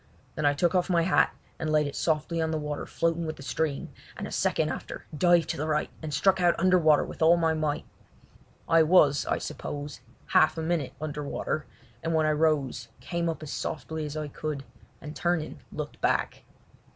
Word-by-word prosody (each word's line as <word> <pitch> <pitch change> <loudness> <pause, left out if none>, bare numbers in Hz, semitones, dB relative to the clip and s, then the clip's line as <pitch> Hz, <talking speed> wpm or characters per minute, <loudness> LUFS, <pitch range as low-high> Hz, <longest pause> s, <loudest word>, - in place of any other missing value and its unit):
Then 150 - 0
I 145 - +3
took 170 +4 +2
off 180 0 +1
my 170 -2 +3
hat 180 - +3 0.3
and 155 - -1
laid 150 -1 +3
it 145 - -5
softly 160 +1 0
on 160 - 0
the 160 - -1
water 150 -1 -4
floating 165 0 0
with 155 - -3
the 135 - -11
stream, 150 0 -2 0.3
and - - -4
a - - -7
second - - +1
after - - -6
dived 175 +2 +4
to - - -2
the 155 - -2
right 150 -1 0
and 155 -1 -5
struck 185 +6 +3
out 175 -1 +3
under 185 +1 +4
water 155 -3 +5
with - - -10
all 165 +2 +6
my 165 -1 +2
might. 155 -2 -1 0.8
I 165 0 +5
was, 155 -3 +4
I - - +1
suppose, 145 0 -6 0.3
half 155 - +4
a 160 - -2
minute 160 -4 -1
under 150 -1 -4
water, 150 +1 -3 0.3
and 165 0 -1
when 160 -1 +3
I 155 - +3
rose 150 -4 +1
came 170 -1 -2
up 160 -1 -4
as 150 - -6
softly 155 +1 -4
as 150 +1 -6
I 155 -1 -3
could, 145 -1 -4 0.4
and 150 0 -8
turning, 170 - -1
looked - - -6
back. - - 0
155 Hz, 205 wpm, -28 LUFS, 150-165 Hz, 0.8 s, all